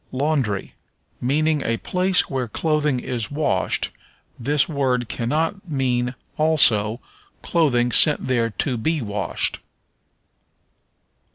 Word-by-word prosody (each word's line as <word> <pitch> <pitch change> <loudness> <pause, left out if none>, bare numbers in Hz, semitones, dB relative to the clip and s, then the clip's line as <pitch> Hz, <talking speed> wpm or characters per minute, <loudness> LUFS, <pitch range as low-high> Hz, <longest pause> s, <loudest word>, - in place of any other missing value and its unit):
Laundry. 130 -7 -1 0.5
Meaning 150 +4 +1
a 115 -3 -1
place 185 +5 +1
where 130 -3 -3
clothing 150 +1 0
is 120 -4 -4
washed, 145 -11 -1 0.5
this 140 +4 +1
word 130 -5 -1
cannot 165 - -2
mean, 125 -3 -1 0.2
also, 120 -8 +3 0.4
clothing 125 -8 +1
sent 150 +3 +5
there 120 -3 +1
to 125 +3 -2
be 160 +8 0
washed. 105 -5 -1
135 Hz, 100 wpm, -22 LUFS, 120-155 Hz, 0.5 s, sent